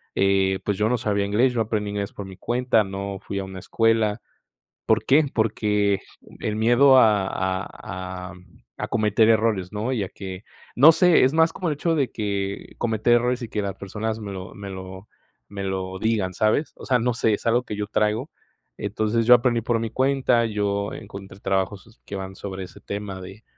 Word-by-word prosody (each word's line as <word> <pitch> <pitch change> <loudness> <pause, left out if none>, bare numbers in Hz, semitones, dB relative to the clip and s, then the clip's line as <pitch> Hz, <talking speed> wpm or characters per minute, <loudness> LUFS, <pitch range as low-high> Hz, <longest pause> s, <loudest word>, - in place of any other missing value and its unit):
eh, 95 -1 +2
pues 100 -2 0
yo 105 +2 +2
no 125 +1 +1
sabía 100 -1 0
inglés. 110 +6 +2
Yo 115 - 0
aprendí 105 -1 -1
inglés 100 -1 -3
por 100 - -7
mi 95 -1 -11
cuenta, 120 -1 +1
no 100 0 -5
fui 100 - -4
a - - -3
una 95 0 -8
escuela, 115 +1 +1 0.7
¿por - - +2
qué?, 145 +3 +5
porque 105 -3 +1 0.4
el 105 - -2
miedo 120 +4 +6
a 105 -5 +4
a 95 0 -4
am 90 0 -15 0.3
a - - -3
cometer 110 -1 +3
errores, 110 -5 +2
¿no?, 110 +5 -2
y 115 -5 0
a 95 - -3
que, 95 -1 -8 0.3
no 145 +6 +8
sé, 180 +1 +5
es 130 - +3
más 165 0 +4
como 180 - -3
el 150 - 0
hecho 165 +3 0
de 140 -5 0
que 100 -2 -4
cometer 115 0 +1
errores 125 +1 +1
y 115 - -5
que 105 - -2
las 100 -1 -4
personas 110 +3 -4
me 105 -2 -6
lo 95 -1 -8
me 100 -1 -7
lo 95 +1 -8 0.4
me 100 -1 -6
lo 95 -1 -3
digan, 105 -5 0
¿sabes?, 110 - +1
o - - -11
sea, 125 -2 +3
no 120 +1 0
sé, 110 -2 +2
es 115 - -6
algo 120 +2 +3
que 105 - -5
yo 105 0 -3
traigo. 110 +5 0 0.5
Entonces, 110 +2 0
yo 125 - +9
aprendí 120 -1 +2
por 115 +1 0
mi 115 0 -3
cuenta. 130 -2 +2
Yo 100 -1 -1
encontré 100 -1 -10
trabajos 95 +4 -2
que 100 - -5
van 95 0 -6
sobre 95 -1 -6
ese 90 - -13
tema 100 -2 -6
de 95 +4 -11
105 Hz, 200 wpm, -24 LUFS, 95-115 Hz, 0.7 s, yo